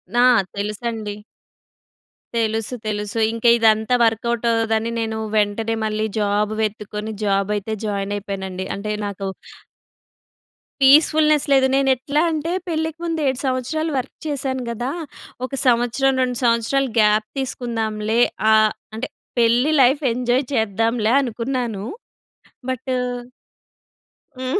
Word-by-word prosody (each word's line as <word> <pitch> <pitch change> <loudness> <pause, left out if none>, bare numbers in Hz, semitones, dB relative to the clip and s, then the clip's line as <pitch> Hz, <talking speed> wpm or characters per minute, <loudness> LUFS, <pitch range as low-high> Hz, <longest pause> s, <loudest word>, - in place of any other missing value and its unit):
నా 245 - +5 0.3
తెలుసండి. 210 +1 -3 1.2
తెలుసు, 225 +1 -1
తెలుసు. 210 +1 -3
ఇంక 230 +1 -6
ఇదంతా 220 +1 +3
వర్క్‌అవుట్ 235 +1 0
అవ్వదని 225 0 0
నేను 220 -1 -2 0.2
వెంటనే 215 +2 +1
మళ్ళీ 215 0 -1
జాబ్ 205 0 +1
వెతుక్కొని 210 0 -3
జాబ్ 195 0 +1
అయితే 210 +2 -3
జాయిన్ 200 -1 -2
అయిపోయానండి. 190 -2 -5
అంటే 210 +1 -4
నాకు 200 -1 -4 1.5
పీస్‌ఫుల్‌నెస్ 305 +2 +5
లేదు. 265 -1 +5
నేనెట్లా 270 +2 +2
అంటే 315 +2 -2 0.2
పెళ్ళికి 320 0 -2
ముందు 330 -1 -1
7 260 -1 0
సంవత్సరాలు 270 +5 -1
వర్క్ 255 +1 -4
చేశాను 265 -3 -2
గదా! 240 +3 -3 0.5
ఒక 260 - -10
సంవత్సరం, 245 +3 +3
2 250 -1 -2
సంవత్సరాలు 235 +3 +2
గ్యాప్ 215 0 +3
తీసుకుందాంలే. 225 -3 -1 0.3
ఆహ్, 215 0 +5 0.2
అంటే 230 +5 -3 0.3
పెళ్లి 240 +5 +3
లైఫ్ 265 +4 +4
ఎంజాయ్ 250 +2 +1
చేద్దాంలే 225 0 +1
అనుకున్నాను. 240 -4 -3 0.9
బట్టు 255 +1 -2 1.5
హ్మ్. 260 +8 -1
230 Hz, 110 wpm, -21 LUFS, 215-260 Hz, 1.5 s, నా